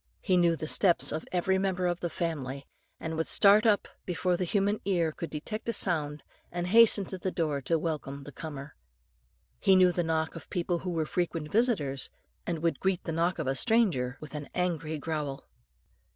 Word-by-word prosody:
He 185 - +1
knew 170 -2 +4
the 155 - -5
footsteps 175 +2 +3
of 155 - -4
every 190 +1 +1
member 190 -2 0
of 175 0 0
the 175 - -2
family, 140 -6 -4 0.3
and 160 0 -4
would 160 0 -1
start 210 +2 +5
up, 205 -2 +3 0.2
before 180 0 0
the 180 +1 -1
human 205 +3 0
ear 175 -5 +1
could 165 +2 -6
detect 215 +10 -5
a - - 0
sound, 150 -7 -1 0.3
and 175 0 -3
hasten 215 0 +6
to 190 - -7
the 185 - -1
door 155 -6 -1
to 165 +5 +1
welcome 150 -4 -4
the 145 - -10
comer. 145 -1 -8 0.8
He 195 - +5
knew 185 -1 +6
the 175 - 0
knock 160 -1 -1
of 165 - -10
people 175 -2 -1
who 185 - -5
were 165 -3 -1
frequent 165 -2 -2
visitors, 190 - +1 0.4
and 165 -2 -3
would 165 - +1
greet 190 -2 0
the - - -4
knock 170 +2 0
of - - -3
a 135 - +1
stranger 135 - +2
with 155 - -10
an 150 -1 -6
angry 165 -3 -1
growl. 150 -3 -4
170 Hz, 195 wpm, -29 LUFS, 155-185 Hz, 0.8 s, hasten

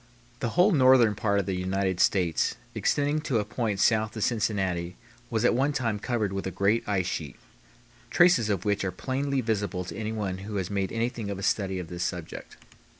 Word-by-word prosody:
The 120 - -1
whole 185 +4 +6
northern 130 - +5
part 100 -1 0
of 100 - -1
the 95 - -2
United 95 0 -1
States 90 -5 +2 0.2
extending 145 +1 0
to 140 -6 0
a 105 - 0
point 105 -2 -2
south 110 +1 +2
of 110 - -1
Cincinnati 95 -7 -1 0.3
was 115 0 0
at - - +4
one 135 +4 +1
time 115 -6 -1
covered 110 -4 -1
with 95 0 -3
a - - -1
great 100 +4 +1
ice 95 -3 +1
sheet, 75 -5 -4 0.7
traces 175 -11 +4
of 100 -2 -1
which 100 -1 +1
are 95 - -1
plainly 135 +6 -2
visible 105 -5 -2
to - - -7
anyone 105 -3 -3
who 105 +2 -7
has 95 -1 -2
made 100 -1 -1
anything 115 -2 -2
of 100 - -3
a 100 - -7
study 95 -2 0
of 90 -3 -6
this 90 0 -4
subject. 90 -3 -6
105 Hz, 200 wpm, -27 LUFS, 95-120 Hz, 0.7 s, whole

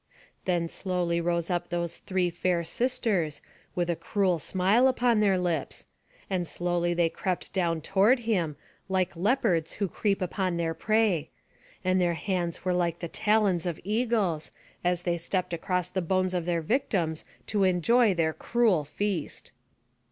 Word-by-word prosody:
Then 175 -2 +1
slowly 175 -1 -1
rose 170 +1 -1
up 175 0 -1
those 170 -1 -3
three 185 -2 0
fair 175 0 0
sisters, 210 - 0 0.4
with 175 -1 0
a 170 - 0
cruel 185 -2 0
smile 195 - +3
upon 245 -3 +2
their 200 -3 +3
lips; 170 -6 -2 0.4
and 180 -3 -1
slowly 175 0 0
they 170 -1 +3
crept 185 +2 -3
down 170 -4 0
toward 205 - +3
him, 180 -10 0 0.3
like 185 -2 0
leopards 185 - +1
who 200 - -1
creep 200 +2 0
upon 185 -1 -1
their 165 -1 0
prey; 205 -5 +1 0.6
and 185 0 +3
their 175 -1 +2
hands 175 0 -2
were 180 - +2
like 170 -2 0
the 170 - -5
talons 200 -3 +1
of 170 -3 -3
eagles, 210 -6 0 0.3
as 175 0 +1
they 175 -1 0
stept 180 +1 -2
across 180 +1 -1
the 185 +1 -2
bones 185 +1 0
of 175 -2 -1
their 170 -2 0
victims 170 - 0 0.2
to 205 -2 +1
enjoy 190 +4 +4
their 160 -2 +1
cruel 225 -9 +2
feast. 180 +2 -3
180 Hz, 155 wpm, -28 LUFS, 170-200 Hz, 0.6 s, enjoy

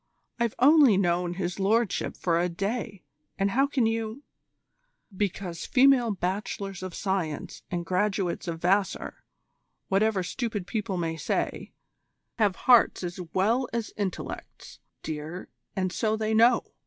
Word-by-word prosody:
I've 235 -2 0
only 275 -5 +6
known 175 -2 +1
His 180 0 -3
Lordship 215 +2 +1
for 170 -2 +1
a 175 +1 +1
day, 200 +2 -3 0.3
and 195 0 +1
how 270 +6 +3
can 270 -4 +1
you 225 +4 -2 0.4
" - - -48 0.3
"Because 185 -3 -3
female 260 -2 +5
Bachelors 195 0 -3
of 185 -2 -6
Science 185 -7 -3
and 175 -1 -3
graduates 185 0 -1
of 165 -1 -3
Vassar, 190 +3 0 0.7
whatever 195 0 +2
stupid 215 -1 -3
people 200 -3 -3
may 165 -2 -2
say, 155 - -2 0.7
have 205 -4 +3
hearts 245 -6 +5
as 175 +1 -5 0.2
well 230 +7 +2
as 230 -2 -3
intellects, 200 -4 -6 0.2
dear, 160 +3 -6 0.3
and 185 -1 -1
so 220 -1 0
they 220 0 -1
know. 235 +2 +4
195 Hz, 135 wpm, -27 LUFS, 180-225 Hz, 0.7 s, only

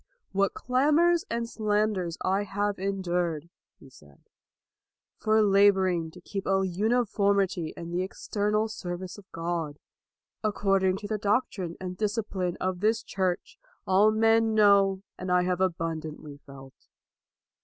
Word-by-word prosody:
What 195 0 +1
clamors 300 +7 +2
and 230 0 -2
slanders 210 -6 -1
I 190 +2 +1
have 205 0 -2
endured,' 180 -5 -1
1 170 - -24 0.3
he 135 - -16
said, 75 - -19 0.5
" - - -65
for 220 0 +4
laboring 190 -4 +3
to 180 - -14
keep 195 +2 -5
a 195 0 +2
uniformity 200 -3 +1
in 170 0 -7
the 175 +1 0
external 210 +3 -1
service 180 -2 -6
of 200 - -19
God, 165 -3 -3 0.7
according 195 -3 +1
to 205 - -7
the 215 0 -2
doctrine 200 -5 -1
and 180 -1 -6
discipline 205 -4 -2
of 185 -1 -2
this 220 +3 +1
Church, 185 -2 -3 0.3
all 195 +3 +5
men 225 0 +3
know 200 -2 +4 0.2
and 185 0 -4
I 180 0 +4
have 180 0 -1
abun 165 -3 -1
dantly 150 -2 -9
felt." 135 -1 -12
195 Hz, 140 wpm, -27 LUFS, 175-210 Hz, 0.7 s, all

